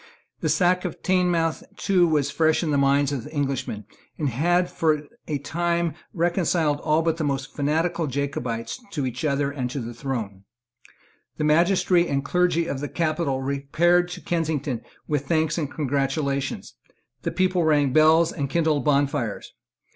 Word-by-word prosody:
The - - -1
sack 180 -1 +2
of 180 - -6
Teignmouth 175 -3 +1 0.2
too 180 -3 +3
was 145 -3 +1
fresh 160 +1 +2
in 155 - -1
the 145 - +2
minds 140 0 +3
of 130 -5 -4
Englishmen, 135 -8 -3 0.3
and 150 -3 0
had 175 +8 +2
for 155 -2 +1 0.2
a 150 - -1
time 170 +3 -1 0.2
reconciled 170 -3 +1
all 155 +1 +1
but 165 0 0
the 160 - -2
most 140 -1 -2
fanatical 160 +3 0
Jacobites 130 - -3
to 145 -5 -1
each 125 -1 -4
other 140 -1 +1
and 130 -3 -3
to 140 - -4
the 120 -1 -6
throne. 115 -6 -5 0.9
The - - -2
magistracy 175 +3 +3
and 140 0 -1
clergy 180 0 +2
of 140 -5 -3
the 145 - -4
capital 155 -5 -1
repaired 155 +6 +2
to - - -7
Kensington 150 -7 -2 0.3
with 145 -2 -1
thanks 160 0 +1
and 150 -4 -2
congratulations. 140 -1 -2 0.5
The - - -2
people 185 -2 +1
rang 145 -4 +3
bells 160 +2 +5
and 140 -5 -3
kindled 155 -2 +1
bonfires. 140 -6 0
150 Hz, 155 wpm, -24 LUFS, 140-170 Hz, 0.9 s, bells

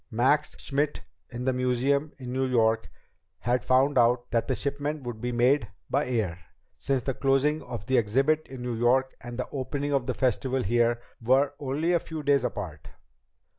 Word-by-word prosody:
Max 130 +6 +2
Schmidt 145 +1 -1 0.3
in 125 +1 -5
the 130 - +2
museum 130 +4 +1
in 125 -2 -6
New 130 0 0
York 115 -3 +2 0.5
had 120 +1 0
found 130 +2 +3
out 120 +1 +2
that 115 -1 +1
the 130 - 0
shipment 145 +2 -3
would 120 -3 -6
be 125 0 -2
made 125 +1 +3 0.2
by 140 +1 +1
air, 105 -9 -1 0.4
since 135 -3 -1
the 135 - -1
closing 135 +4 +2
of 115 -4 -7
the 130 - +2
exhibit 135 +8 +1
in 130 -2 -8
New 125 -1 -2
York 125 +3 +2
and 120 -1 -7
the 125 - -3
opening 145 +1 -2
of 135 -2 0
the 130 - -1
Festival 130 +1 0
here 120 +3 +2 0.2
were 130 +4 +3
only 150 +5 0
a 170 - +4
few 160 -2 -7
days 140 -2 +3
apart. 90 -11 -5
130 Hz, 180 wpm, -27 LUFS, 120-140 Hz, 0.5 s, a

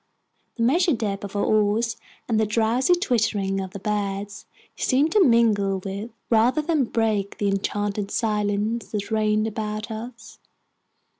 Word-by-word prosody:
The 230 - -1
measured 320 +3 +3
dip 200 -3 -3
of 200 0 -7
our 205 - +1
oars 215 +2 +2 0.3
and 225 -2 +1
the 220 - +2
drowsy 230 - +2
twitterings 210 - 0
of 190 - -6
the 195 - -8
birds 205 0 -3 0.3
seemed 285 +4 +2
to 415 +1 +5
mingle 220 - +3
with, 195 +4 -5 0.2
rather 240 +7 +3
than 305 -4 +1
break, 215 -4 -1
the 205 - 0
enchanted 200 +1 -2
silence 210 +1 -1
that 205 0 -3
reigned 215 0 +2
about 215 0 -4
us. 230 +1 -8
215 Hz, 145 wpm, -24 LUFS, 205-230 Hz, 0.3 s, to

